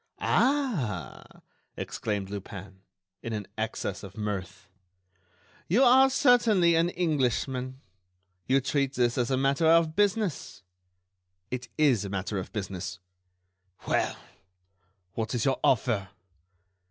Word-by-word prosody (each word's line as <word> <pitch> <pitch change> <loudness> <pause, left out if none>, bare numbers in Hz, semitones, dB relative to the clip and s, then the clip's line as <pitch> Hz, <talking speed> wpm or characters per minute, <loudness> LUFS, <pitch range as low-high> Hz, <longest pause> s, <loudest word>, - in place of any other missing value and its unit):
"Ah!" 170 - -1 0.4
exclaimed 100 -3 -3
Lupin, 95 -1 -8 0.4
in 115 - -5
an 105 -2 -4
access 110 -3 -3
of 100 +1 -11
mirth, 100 -3 -5 1.0
"you 225 +10 +4
are 265 +1 +6
certainly 235 -10 +4
an 165 +1 +3
Englishman. 130 -6 -1 0.7
You 135 +1 +3
treat 135 0 0
this 120 -1 +2
as 120 -2 0
a 130 - +1
matter 135 +4 +2
of 165 -1 +4
business." 205 - -1 0.9
"It 125 0 -5
is 135 -9 +3
a 100 - -5
matter 100 +1 -3
of 95 - -7
business." 95 -3 -5 0.9
"Well? - - 0 1.0
what 110 0 -3
is 115 - 0
your 135 -1 +1
offer?" 110 -6 +1
125 Hz, 115 wpm, -28 LUFS, 105-165 Hz, 1.0 s, are